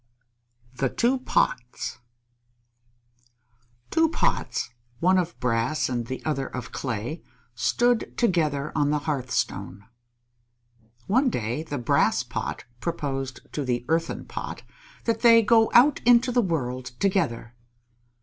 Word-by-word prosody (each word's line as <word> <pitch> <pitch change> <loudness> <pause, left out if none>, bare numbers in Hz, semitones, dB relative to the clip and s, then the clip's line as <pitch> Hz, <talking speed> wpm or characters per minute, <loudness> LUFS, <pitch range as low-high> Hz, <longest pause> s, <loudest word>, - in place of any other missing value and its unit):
_ - - -23
THE 135 - +2
TWO 250 - +1
POTS 125 - -1 1.9
Two 325 0 +3
Pots, 215 - -1 0.3
one 185 +2 +4
of 175 -1 -3
brass 120 +5 0
and 120 -2 -2
the 130 - -6
other 135 -3 -1
of 125 - -7
clay, 125 +5 -4 0.3
stood 225 - +1
together 155 - +1
on 145 -1 +1
the 150 - +2
hearthstone. 130 - -2 1.2
One 255 +7 +3
day 120 - -2
the 150 -3 -5
Brass 120 - +2
Pot - - -4 0.2
proposed 135 -5 -3
to 150 - -2
the 125 -2 -2
Earthen 165 +1 -1
Pot - - -6 0.4
that 230 -1 0
they 230 -1 +7
go 225 +1 +4
out 265 +4 +6
into 245 +1 +5
the 245 0 +3
world 130 - -2
together. 160 - 0
150 Hz, 120 wpm, -25 LUFS, -, 1.9 s, they